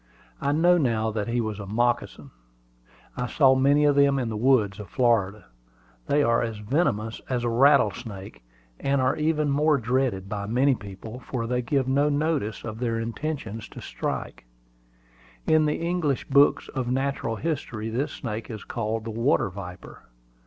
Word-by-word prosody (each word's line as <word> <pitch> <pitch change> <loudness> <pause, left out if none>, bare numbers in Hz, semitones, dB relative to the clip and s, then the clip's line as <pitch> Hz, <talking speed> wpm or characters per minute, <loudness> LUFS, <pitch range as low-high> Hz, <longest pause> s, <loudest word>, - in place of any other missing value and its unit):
I 140 - +1
know 175 +4 +4
now 110 -6 +1
that 105 -2 -3
he 120 +1 0
was 110 -2 -4
a 100 - -7
moccasin. 120 +4 -1 0.8
I 125 0 -2
saw 135 +1 +4
many 140 +3 +3
of 145 -1 +4
them 140 -1 +4
in 125 -3 -1
the 110 - -4
woods 110 -4 +2
of 105 -4 -8
Florida. 105 -5 +1 0.6
They 145 +1 +3
are 115 -2 +2
as 115 -2 -3
venomous 110 -2 -1
as 125 -2 -1
the 120 - 0
rattlesnake, 115 - +1 0.4
and 140 0 +1
are 130 0 +2
even 155 -1 0
more 150 +1 +3
dreaded 120 -5 -1
by 100 0 -4
many 130 +5 +3
people, 110 +2 -8
for 125 -2 -4
they 125 +1 -1
give 130 +2 0
no 140 +3 +2
notice 145 -7 -1
of 110 -1 -6
their 115 -2 -1
intention 115 -1 -4
to 105 - -10
strike. - - -5 1.0
In 155 -1 +4
the 150 - 0
English 170 -5 -1
books 140 +1 +4
of 130 -3 -3
natural 135 -3 -1
history 120 -7 -3
this 130 +6 -1
snake 115 -3 -5
is 110 -3 -7
called 110 -1 -3
the 115 - -5
water 115 -3 +1
viper. 90 -1 -9
120 Hz, 165 wpm, -25 LUFS, 110-140 Hz, 1.0 s, know